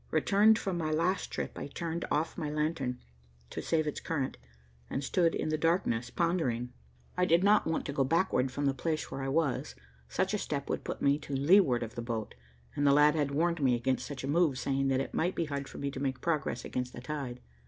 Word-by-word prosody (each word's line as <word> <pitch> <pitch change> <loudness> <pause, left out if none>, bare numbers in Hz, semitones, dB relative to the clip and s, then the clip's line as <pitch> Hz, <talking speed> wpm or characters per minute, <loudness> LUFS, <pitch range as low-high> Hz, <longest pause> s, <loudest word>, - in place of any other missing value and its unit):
Returned 205 +7 +4
from 190 -5 -2
my 155 -2 -1
last 170 +5 0
trip, - - -4
I - - -4
turned 165 +3 -4
off 155 +2 0
my 155 -4 -3
lantern, 150 -4 -1 0.5
to - - -4
save 160 -2 +1
its 150 - -3
current, 140 -5 -2 0.5
and 135 - -2
stood 165 +4 +2
in - - -1
the 155 0 0
darkness 150 -8 +1
pondering. 130 -8 0 0.4
I 180 - +2
did 170 +1 +4
not 205 -2 +4
want 160 - -1
to 140 - -3
go 140 - +2
backward 135 -3 +2
from 145 +2 -2
the 135 - +3
place 155 +3 -2
where 135 - -4
I 135 - -2
was. 140 -1 0 0.3
Such - - 0
a - - 0
step - - -3
would - - -2
put - - -5
me 140 +1 +3
to 140 -1 -5
leeward 140 -4 +4
of 115 - -6
the 120 - -5
boat, 115 -2 -4 0.4
and 145 - +2
the 140 - +6
lad 150 +1 +6
had 150 -3 0
warned 165 +3 0
me 130 -3 +4
against 130 +2 -1
such 140 -3 -6
a - - -3
move, 155 -2 +2
saying 135 +1 0
that 135 0 +2
it - - -5
might 175 +3 0
be 170 - 0
hard 140 -2 -4
for - - -10
me 140 0 -2
to 135 - -6
make 135 -2 -2
progress 150 -7 -1
against 125 0 -3
the 120 - -8
tide. 125 -2 -5
145 Hz, 230 wpm, -31 LUFS, 135-165 Hz, 0.5 s, the